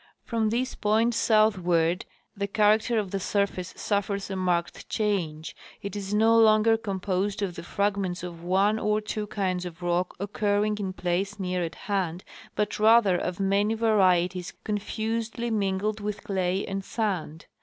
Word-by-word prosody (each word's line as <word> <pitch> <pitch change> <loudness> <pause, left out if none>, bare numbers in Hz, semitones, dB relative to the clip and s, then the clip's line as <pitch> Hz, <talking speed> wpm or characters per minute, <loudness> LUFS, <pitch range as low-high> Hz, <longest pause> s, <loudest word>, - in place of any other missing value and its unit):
From 225 -2 0
this 250 +3 -1
point 225 +3 +2
southward 185 -7 +2 0.3
the 200 0 -2
character 215 +3 +3
of 200 -4 -1
the 195 - -1
surface 195 -2 -1
suffers 200 -1 -1
a - - -2
marked 180 -2 -1
change. 175 -8 -2 0.3
It 200 +1 -5
is 200 -1 -5
no 220 +2 +4
longer 220 0 +5
composed 200 -1 -2
of 185 -3 -2
the 170 - -7
fragments 195 -1 -1
of 170 -2 -7
one 195 +4 +2
or 210 0 +1
two 215 0 -4
kinds 185 -3 -1
of 175 0 -8
rock 175 +1 0
occurring 205 +1 0
in 190 -2 -3
place 190 +3 -2
near 180 -1 -1
at 165 -1 -4
hand, 185 -4 -2 0.3
but 210 0 -1
rather 215 -3 +5
of 175 +1 -3
many 200 +3 +2
varieties 185 -5 +2
confusedly 225 +2 -2
mingled 205 0 0
with 210 0 -4
clay 190 -1 -1
and 195 0 -4
sand. 185 -8 -3
200 Hz, 155 wpm, -27 LUFS, 180-215 Hz, 0.3 s, longer